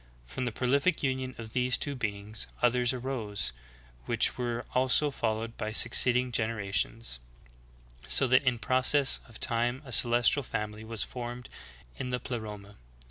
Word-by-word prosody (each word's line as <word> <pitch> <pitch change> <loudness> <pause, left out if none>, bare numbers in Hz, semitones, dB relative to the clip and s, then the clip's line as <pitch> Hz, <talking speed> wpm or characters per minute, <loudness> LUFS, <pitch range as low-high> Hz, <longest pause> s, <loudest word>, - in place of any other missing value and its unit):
From 125 - -4
the 120 - -1
prolific 140 +9 +1
union 130 -1 -2
of 110 -2 -8
these 125 0 +1
two 145 - -2
beings, 105 -3 -3 0.2
others 125 0 +3
arose, 115 - -3 0.5
which - - +3
were 120 -1 -3
also 130 +3 +3
followed 115 -2 -2
by 110 - -3
succeed 120 +2 +4
ing 125 0 -1
generations; 110 - -1 0.9
so 135 - +6
that 130 +1 +4
in 125 -2 +1
process 130 +4 +3
of 115 - -13
time 120 +4 0
a 130 - -10
celestial 120 +4 +4
fam 105 -4 -4
ily 110 +1 -11
was 110 -2 -1
formed 120 0 -7 0.5
in 125 - -3
the 125 0 -1
Pleroma. 105 -5 -7
120 Hz, 150 wpm, -29 LUFS, 110-130 Hz, 0.9 s, so